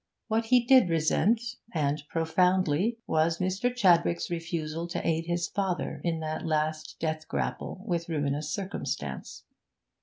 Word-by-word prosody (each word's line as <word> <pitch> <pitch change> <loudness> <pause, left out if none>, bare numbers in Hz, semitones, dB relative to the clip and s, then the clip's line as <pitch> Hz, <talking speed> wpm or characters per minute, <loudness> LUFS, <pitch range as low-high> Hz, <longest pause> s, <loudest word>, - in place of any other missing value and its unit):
What 225 +1 +1
he 245 0 +4
did 255 -7 +6
resent, 220 +9 +1 0.2
and 145 -1 0
profoundly, 180 +4 +2
was 160 +1 +2
Mr. 190 +7 0
Chadwick's 175 -7 +3
refusal 165 -1 -3
to 170 - -3
aid 165 0 0
his 175 0 0
father 190 -3 -2
in 165 -2 -1
that 155 0 -3
last 155 0 -1
death 155 -1 -2
grapple 190 - -3
with 170 -4 -2
ruinous 145 -1 -1
circumstance. 200 -1 -4
170 Hz, 130 wpm, -28 LUFS, 155-190 Hz, 0.2 s, did